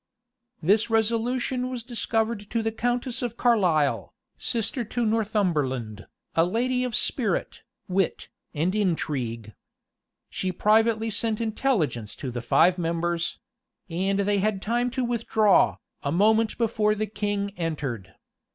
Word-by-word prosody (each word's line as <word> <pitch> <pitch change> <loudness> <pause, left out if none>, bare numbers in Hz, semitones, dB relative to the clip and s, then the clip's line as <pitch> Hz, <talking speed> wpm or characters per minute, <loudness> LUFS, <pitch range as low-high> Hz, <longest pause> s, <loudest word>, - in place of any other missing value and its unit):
This 205 +7 +3
resolution 240 +3 0
was 250 -3 -5
discovered 225 -3 -2
to 230 -1 -1
the 225 - 0
countess 245 +2 -1
of 240 -2 -3
Carlisle, 180 - +2 0.2
sister 235 +2 -1
to 235 +2 -2
Northumberland, 155 - 0 0.3
a 165 - +4
lady 250 +7 0
of 250 -3 -2
spirit, 215 -9 -1 0.3
wit, 190 0 0 0.2
and 165 +5 0
intrigue.[] 130 - -1 0.7
She 185 - -3
privately 220 +3 +2
sent 215 +1 0
intelligence 215 - -1
to 130 - -5
the 120 0 -4
five 180 +9 +4
members; 170 0 -1 0.5
and 190 +4 0
they 200 0 +1
had 205 0 0
time 240 +4 0
to 260 +1 -2
withdraw, 220 -3 +3 0.2
a 140 - -2
moment 220 +5 +3
before 215 -2 +1
the 215 +1 -1
king 205 -1 -2
entered. 145 - -4
210 Hz, 125 wpm, -26 LUFS, 170-230 Hz, 0.7 s, a